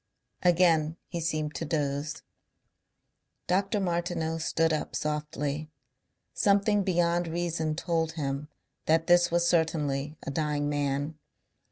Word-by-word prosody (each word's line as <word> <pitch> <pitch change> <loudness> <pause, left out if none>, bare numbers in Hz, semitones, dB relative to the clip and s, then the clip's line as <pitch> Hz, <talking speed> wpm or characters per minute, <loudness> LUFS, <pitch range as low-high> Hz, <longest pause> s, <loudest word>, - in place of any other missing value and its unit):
Again 170 -3 +3
he 170 -1 -3
seemed 155 -2 -1
to - - -4
doze. 145 -1 -2 1.2
Dr. 195 +4 +1
Martineau 170 -3 -1
stood 165 0 +1
up 155 - -3
softly. 150 0 -2 0.6
Something 205 +1 +3
beyond 175 -2 +1
reason 165 -2 -1
told 165 -1 -1
him 140 -2 -3 0.4
that 160 +1 +3
this 175 0 +5
was 170 0 +2
certainly 150 -4 0
a - - -4
dying 150 0 0
man. 145 +1 -1
160 Hz, 115 wpm, -28 LUFS, 150-175 Hz, 1.2 s, this